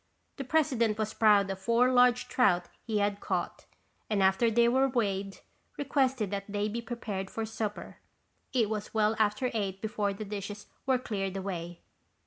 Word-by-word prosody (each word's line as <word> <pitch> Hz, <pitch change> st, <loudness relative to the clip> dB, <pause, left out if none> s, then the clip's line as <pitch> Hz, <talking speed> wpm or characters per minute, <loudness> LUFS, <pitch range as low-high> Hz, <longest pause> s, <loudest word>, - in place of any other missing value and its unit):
The 275 Hz, -, -3 dB
president 250 Hz, -7 st, +1 dB
was 215 Hz, 0 st, -2 dB
proud 205 Hz, -3 st, +4 dB
of 190 Hz, -, -5 dB
four 235 Hz, +5 st, +3 dB
large 250 Hz, 0 st, +4 dB
trout 180 Hz, -9 st, +3 dB, 0.2 s
he 220 Hz, -2 st, -1 dB
had 205 Hz, 0 st, 0 dB
caught -, -, -3 dB, 0.4 s
and 205 Hz, -3 st, +2 dB
after 190 Hz, +5 st, +4 dB
they 235 Hz, +1 st, +4 dB
were 265 Hz, +3 st, +3 dB
weighed, 200 Hz, -5 st, -2 dB, 0.4 s
requested 265 Hz, -6 st, 0 dB
that 200 Hz, -1 st, -3 dB
they 205 Hz, 0 st, 0 dB
be 230 Hz, +3 st, -3 dB
prepared 215 Hz, -5 st, -5 dB
for 225 Hz, -, -3 dB
supper. 215 Hz, -1 st, -5 dB, 0.5 s
It 240 Hz, -5 st, +2 dB
was 210 Hz, 0 st, -5 dB
well 215 Hz, 0 st, +3 dB
after 215 Hz, +4 st, +1 dB
eight 195 Hz, -4 st, -2 dB
before 210 Hz, -1 st, -1 dB
the 215 Hz, +2 st, -6 dB
dishes 205 Hz, 0 st, -6 dB, 0.2 s
were 260 Hz, -1 st, +4 dB
cleared 195 Hz, -5 st, -3 dB
away. 175 Hz, -3 st, -5 dB
215 Hz, 165 wpm, -30 LUFS, 200-235 Hz, 0.5 s, proud